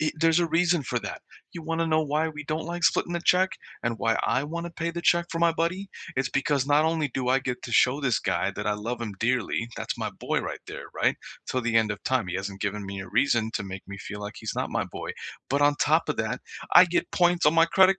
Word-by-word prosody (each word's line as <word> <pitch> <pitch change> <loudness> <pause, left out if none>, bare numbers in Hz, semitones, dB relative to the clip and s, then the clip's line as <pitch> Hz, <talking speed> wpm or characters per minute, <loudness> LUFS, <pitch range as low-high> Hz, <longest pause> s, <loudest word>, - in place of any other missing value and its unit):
i 155 - +2
there's 165 +1 +3
a 170 - +2
reason 170 0 +2
for - - -1
that, - - -6 0.3
you 170 - -7
wanna 165 +1 -1
know 155 -1 +3
why 155 +1 0
we 150 -1 -7
don't 155 +1 -2
like 175 0 -3
splitting 175 - +2
the 170 - -1
check, 185 +2 +4 0.3
and 115 -1 -1
why 115 0 +2
I 130 +4 +1
wanna 170 +2 -4
pay 170 0 -3
the 170 0 -5
check 170 0 +3
for 165 -2 -3
my 170 - +5
buddy? 180 +4 -2 0.2
It's 130 +1 0
because 140 -1 +1
not 150 +2 +4
only 160 -2 +1
do 130 0 -3
I 130 +1 +3
get 125 -1 -4
to 120 - -6
show 130 +5 +4
this 125 -6 +1
guy 95 +1 0
that 105 - -5
I 105 - +2
love 115 +4 -4
him 110 -4 -4
dearly- 115 -1 0
that's - - -4
my - - -2
boy - - -2
right - - -5
there. - - -7
Right? - - +2 0.3
So 130 - -1
the 120 -2 -1
end 110 -1 +3
of 100 - -4
time, 130 -7 +1
he 90 - -2
hasn't 95 0 -5
given 100 0 -2
me 95 0 -5
a 95 - -8
reason 115 0 +2
to - - -2
make 95 0 -7
me 100 0 -7
feel 105 0 -7
like 105 +1 -6
he's 110 - -4
not - - -2
my - - 0
boy, - - -6 0.4
but 140 +2 +2
on 145 0 +5
top - - +2
of - - 0
that, - - -1 0.4
I 180 - +11
get 175 0 -1
points 175 -1 +3
on 150 +2 +5
my 165 0 +6
credit 190 +2 +5
140 Hz, 265 wpm, -26 LUFS, 115-165 Hz, 0.4 s, I